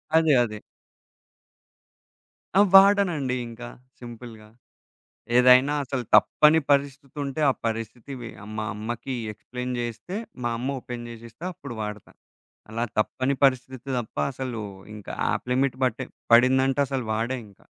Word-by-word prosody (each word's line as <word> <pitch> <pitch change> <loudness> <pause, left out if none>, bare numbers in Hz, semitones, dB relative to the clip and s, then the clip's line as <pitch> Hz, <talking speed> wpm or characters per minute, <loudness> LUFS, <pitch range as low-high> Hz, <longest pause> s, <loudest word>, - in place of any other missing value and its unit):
అదే 160 -2 +5
అదే. 110 -2 -5 2.0
ఆ! - - +6 0.2
వాడనండి 195 -9 +5
ఇంకా 120 +1 -9 0.3
సింపుల్‌గా. 115 -3 -11 0.9
ఏదైనా 125 +3 +6
అసలు 130 -2 -3
తప్పని 155 +1 +5
పరిస్థితుంటే, 140 0 -1
ఆ - - +2
పరిస్థితి 115 +4 -4
వి 120 - -6 0.3
మా 110 - -1
అమ్మకి 120 +5 -5 0.2
ఎక్స్‌ప్లైన్ 125 +4 -6
జేస్తే 120 - -5 0.3
మా 120 - +1
అమ్మ 135 +3 -2
ఓపెన్ 120 -1 -7
జేసిస్తే 115 +5 -11
అప్పుడు 140 -7 -9
వాడతా. 105 -1 -7 0.6
అలా 115 +2 -1
తప్పని 130 +5 0
పరిస్థితి 130 0 0
తప్ప 120 - -7 0.2
అసలు 125 -3 -5 0.3
ఇంకా 105 -2 -8 0.2
యాప్ - - -2
లిమిట్ 130 0 +1
బట్టే 125 -2 -1 0.3
పడిందంటే 130 +3 +5
అసలు 135 -2 -3
వాడే 115 +4 -1
ఇంకా. 100 - -22
125 Hz, 120 wpm, -25 LUFS, 115-140 Hz, 2.0 s, ఆ